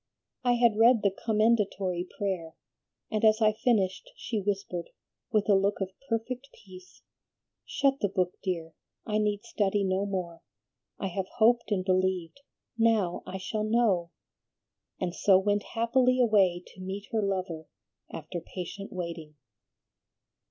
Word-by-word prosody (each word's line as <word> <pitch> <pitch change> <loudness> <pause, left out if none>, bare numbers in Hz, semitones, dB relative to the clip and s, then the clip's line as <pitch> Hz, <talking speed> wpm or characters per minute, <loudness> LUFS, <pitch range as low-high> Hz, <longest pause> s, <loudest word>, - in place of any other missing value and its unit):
I 245 -1 +3
had 235 -3 +3
read 230 -1 +6
the 200 - +3
Commendatory 210 -5 +1
Prayer, 180 -5 -3 0.6
and 215 0 -1
as 220 0 +5
I 215 -1 +5
finished 210 -4 0
she 225 -3 -3
whispered, 195 -3 -3 0.4
with 215 -1 +2
a 205 - +5
look 195 +1 +2
of 195 -1 -3 0.2
perfect 250 +4 -3
peace, 185 -3 -15 0.6
'Shut 275 -1 +1
the 205 - 0
book, 180 -2 0
dear, 165 -4 -3 0.3
I 215 -1 0
need 210 0 0
study 205 -3 0
no 190 +1 0
more; 175 -4 -4 0.6
I - - -4
have 185 +1 -3
hoped 235 +1 +4
and 185 -3 0
believed, 185 +2 0 0.4
now 220 -6 +2
I 190 - -4
shall 210 +3 -3
know;' 215 -6 +2 0.9
and 180 -2 -2
so 190 0 +5
went 205 +2 +1 0.2
happily 255 +2 +3
away 195 -7 +3
to 185 - -14
meet 195 +2 -6
her 225 -2 +1
lover 185 -5 -3 0.4
after 165 +2 -6
patient 185 +4 -7
waiting." 170 -4 -6
200 Hz, 140 wpm, -28 LUFS, 185-220 Hz, 0.9 s, read